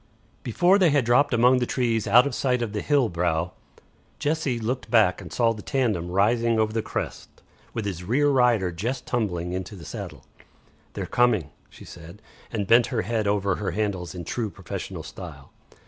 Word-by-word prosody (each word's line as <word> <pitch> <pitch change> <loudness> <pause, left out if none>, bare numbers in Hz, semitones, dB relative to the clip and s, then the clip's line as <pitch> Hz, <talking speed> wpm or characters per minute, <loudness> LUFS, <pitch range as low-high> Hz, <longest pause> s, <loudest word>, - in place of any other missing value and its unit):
Before 175 - +3
they 180 -4 +5
had 145 -4 +2
dropped 130 +5 +3
among 125 +1 +4
the 120 - -1
trees 115 -4 0
out 120 +5 +6
of 140 - -2
sight 125 -2 0
of 110 -3 -4
the 105 - -2
hill 145 -5 +2
brow, 85 -1 -1 0.7
Jessie 150 -4 -1
looked 120 +3 -3
back 110 -5 +3
and 90 -5 -10
saw 115 +7 +2
the 105 - -9
tandem 110 - -1
rising 115 +5 +2
over 110 0 +1
the 115 - 0
crest, - - -5 0.5
with 110 - -3
its 95 -4 -4
rear 125 +11 +1
rider 120 -9 +3
just 120 +10 -4
tumbling 90 -7 -2
into 95 +3 -5
the 85 -5 -11
saddle. 75 - -8 0.7
"They're - - -4
coming," 110 -12 +1 0.2
she - - -14
said, 85 +4 -12 0.3
and 105 -4 -2
bent 115 +4 +5
her 120 -5 -1
head 110 +1 -1
over 100 -2 +1
her 105 - -2
handles 100 -5 -2
in 85 -2 -6
true 115 +4 -2
professional 90 -3 -7
style. - - -10
110 Hz, 185 wpm, -25 LUFS, 95-125 Hz, 0.7 s, out